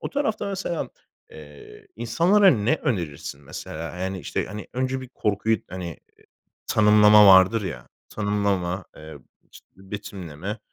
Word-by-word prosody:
O - - -5
tarafta 280 -8 -2
mesela, 190 -4 -3 0.4
eee, 75 -2 -14
insanlara 175 - +4
ne 115 +3 +1
önerirsin, 80 - -4
mesela? 80 +4 -7
Eee, 90 - -5
yani, 95 0 -4
işte, - - -3
hani, 105 +2 -8
önce 130 +1 -2
bir 130 - -9
korkuyu, 110 -2 0
hani, 90 0 -6
eee, 80 - -15 0.4
tanımlama 105 0 +6
vardır 95 +3 +6
ya 70 -10 -7 0.2
tanımlama, 100 -3 -1
eee, 80 -1 -11 0.3
işte, - - -17
betimleme, 95 -1 -7
100 Hz, 135 wpm, -24 LUFS, 90-115 Hz, 0.4 s, tanımlama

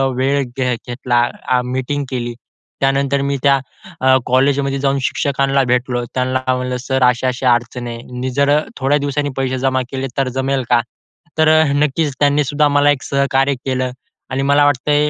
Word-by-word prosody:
वेळ 135 +2 +1
घे 125 -2 0
घेतला, 120 0 -1 0.3
अ, 125 -1 +3
मीटिंग 130 +3 -2
केली 120 -2 -3 0.5
त्यानंतर 135 +1 +1
मी 140 0 -1
त्या 140 -1 +4 0.4
अ, 130 0 +5
कॉलेजमध्ये 135 +1 +1
जाऊन 135 0 +1
शिक्षकांला 135 0 +1
भेटतो, 125 0 0
त्यांना 130 0 0
का 130 0 0
म्हंटलं, 125 0 -3
"सर, 130 0 -1
अशा-अशा 125 0 +2
अडचण 120 +1 -3
आहे. 115 0 -6 0.2
मी 130 +1 -2
जर 140 +2 +2 0.3
थोड्या 140 +2 +2
दिवसांनी 145 0 -1
पैसे 130 -1 -1
जमा 130 0 +1
केले 135 0 -3
तर 135 -2 +1
जमेल 135 0 0
का?" 120 -1 +4 0.6
तर 155 - +5
अ, 155 0 +5
नक्कीच 145 +1 +1
त्यांनी 145 0 +3
सुद्धा 145 +2 +2
मला 145 0 +3
एक 140 -3 -1
सहकार्य 140 0 +1
केलं 130 -1 -1 0.4
आणि 135 - -1
मला 145 +1 +4
वाटतंय 145 +2 +2
135 Hz, 170 wpm, -17 LUFS, 125-140 Hz, 0.6 s, अ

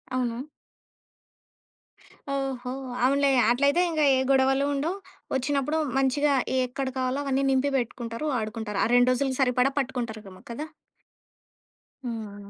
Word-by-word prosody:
అవును. 250 +3 -2 1.8
ఓహో! 265 -2 -3 0.3
అవునులే. 280 +2 +3 0.2
అట్లయితే 280 +7 +3
ఇంక 315 -2 -1
ఏ - - +2
గొడవలు 270 +1 +3
ఉండవు. 320 +7 -1 0.4
వచ్చినప్పుడు 280 +3 0 0.2
మంచిగా 280 +2 +2 0.3
ఏక్కడ 255 +1 -2
కావాలో 260 +2 -1
అవన్నీ 275 0 0
నింపి 265 +1 +2
పెట్టుకుంటారు, 235 +1 -4
వాడుకుంటారు. 215 -2 -3
ఆ - - +3
2 245 +1 +5
రోజులు 265 +1 0
సరిపడా 250 +1 +3
పట్టుకుంటారేమో 225 -7 -5
కదా! 300 +7 -5 1.4
హ్మ్. 205 -3 -7
260 Hz, 110 wpm, -26 LUFS, 240-275 Hz, 1.8 s, 2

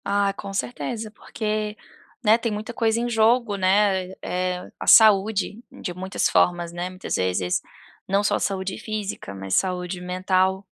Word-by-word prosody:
Ah 200 0 +1
com 200 0 -7
certeza, 220 +1 -4
porque, 215 0 -4 0.5
né, 215 +1 +7
tem 230 -1 -2
muita 215 +3 -5
coisa 225 -1 +1
em 240 - -1
jogo, 230 -1 +2
né, 190 -1 +2
eh, 180 0 -3
a - - -6
saúde 210 +1 +5
de 175 - -6
muitas 190 +2 -1
formas, 175 -1 +2
né, 175 +1 -4
muitas 185 +1 -4
vezes 90 -1 0 0.5
não 195 +2 +2
só - - +1
saúde 190 -1 -2
física 210 - -5
mas 95 -1 -5
saúde 180 - -1
mental, 185 +1 0
195 Hz, 150 wpm, -24 LUFS, 185-215 Hz, 0.5 s, né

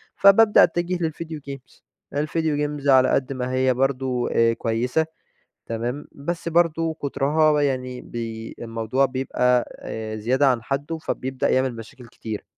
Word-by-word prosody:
فبابدأ 205 +2 +6
أتجه 175 +1 0
للفيديو 160 0 -4
جيمز، 135 -2 -10 0.3
الڤيديو 150 +3 -2
جيمز 150 -2 -1
على 130 -1 +6
قد 135 0 0
ما 130 -1 -3
هي 130 0 +2
برضو 130 -1 0 0.3
كويّسة 125 +7 0 0.6
تمام، 120 +5 -4
بس 170 +4 -4
برضو 165 -1 +2
كترها 150 +1 +1
يعني 130 -2 -2
بي 115 -1 -6
الموضوع 115 +3 0
بيبقى 125 -1 +1 0.5
زيادة 130 +6 +2
عن 125 -4 +1
حده 140 +5 -3
فبيبدأ 130 -4 -2
يعمل 130 -2 +1
مشاكل 120 +2 -11
كتير. 110 -2 -7
135 Hz, 130 wpm, -23 LUFS, 125-155 Hz, 0.6 s, فبابدأ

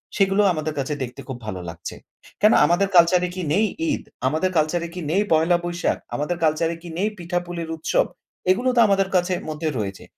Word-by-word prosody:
সেগুলো 195 0 +3
আমাদের 155 0 -3
কাছে 140 +2 -2
দেখতে 125 0 -7
খুব 130 -3 -5
ভালো 95 -4 -4
লাগছে। 85 0 -7 0.5
কেন 215 +2 +6
আমাদের 175 +5 +2
কালচার 175 +1 +6
এ - - -7
কি 185 - -3
নেই 215 +4 +3 0.3
ঈদ? - - -2 0.2
আমাদের 160 +7 0
কালচার 155 +2 +1
এ - - -12
কি 180 - -4
নেই 195 +5 +3
পহেলা 165 +2 +4
বৈশাখ? 175 0 -1 0.2
আমাদের 160 +4 -2
কালচার 160 +1 +2
এ - - -12
কি 175 - -8
নেই 205 +4 +1
পিঠাপুলির 175 -1 -4
উৎসব? 160 - +1 0.5
এগুলো 245 +7 +1
তো - - +4
আমাদের 195 -1 +2
কাছের 180 0 +1
মধ্যে 155 +1 -3
রয়েছে। 100 -2 -4
175 Hz, 200 wpm, -23 LUFS, 155-185 Hz, 0.5 s, কেন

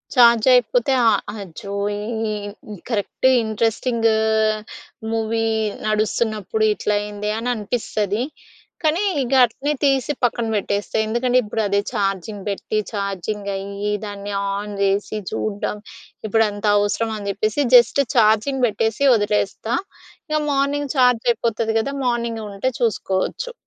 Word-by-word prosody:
Charge 235 -3 +6
అయిపోతే 245 +2 +3
ఆ - - +6 0.3
అచ్చో 195 +2 -9 1.0
ఈ 205 - -9
కరెక్ట్ 225 +3 0 0.2
ఇంట్రెస్టింగ్ 225 +2 0 1.0
మూవీ 225 0 0 0.4
నడుస్తున్నప్పుడు 215 0 0
ఇట్లయింది 210 0 -2
అని 235 +2 -2
అనిపిస్తది. 215 0 -2 0.6
కానీ 320 +5 +2 0.2
ఇక 255 0 -2
అట్లనే 270 +6 -3
తీసి 270 -1 +2
పక్కన 235 -1 +1
పెట్టేస్తా. 200 0 -2
ఎందుకంటే 245 +3 +1
ఇప్పుడు 215 +1 -2
అదే 200 0 +2
ఛార్జింగ్ 200 -2 -2
పెట్టి, 205 +2 -3
ఛార్జింగ్ 200 0 -3
అయ్యి, 200 +1 -4
దాన్ని 205 0 -6 0.2
ఆన్ 205 +1 -4
చేసి 200 +2 0
చూడ్డం. 210 -1 -2 0.5
ఇప్పుడు 225 +1 +3
అంత 205 +1 -6
అవసరంమా? 220 +2 0
అని 200 -1 -4
చెప్పేసి 215 +7 0
జస్ట్ 245 +3 +6
ఛార్జింగ్ 230 +4 +3
పెట్టేసి 225 +3 -1
వదిలేస్తా. 210 +2 0 0.5
ఇక 305 0 +1
మార్నింగ్ 280 0 0
ఛార్జ్ 250 -3 +4
అయిపోతుంది 225 -1 -1
కదా! 275 +5 -2
మార్నింగ్ 235 -2 -1
ఉంటే 210 +7 -1
చూసుకోవచ్చు. 230 - -1
220 Hz, 115 wpm, -21 LUFS, 205-240 Hz, 1.0 s, ఛార్జ్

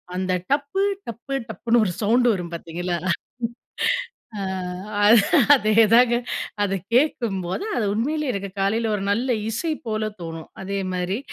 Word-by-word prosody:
அந்த 185 0 -1 0.2
டப்பு 285 +7 +1 0.3
டப்பு 235 +4 -6 0.2
டப்புன்னு 235 +1 +2
ஒரு 185 - 0
சவுண்ட் 235 +4 +3
வரும் 175 -5 -3
பார்த்தீர்களா? 175 +1 -3 1.4
ஆ, - - -4 1.2
அதேதாங்க. 230 +1 +5 0.5
அத 200 -2 0 0.2
கேட்கும்போது 230 - +1
அது 220 - +1
உண்மையிலே 290 +6 -1
எனக்கு 200 -2 -4
காலைல 220 +4 +1
ஒரு 195 - -4
நல்ல 235 +6 0 0.2
இசை 315 +9 -1 0.2
போல 215 0 -1
தோணும். 165 -1 -7
அதே 200 +1 -3
மாதிரி 180 +3 -1
215 Hz, 120 wpm, -23 LUFS, 190-240 Hz, 1.4 s, அதேதாங்க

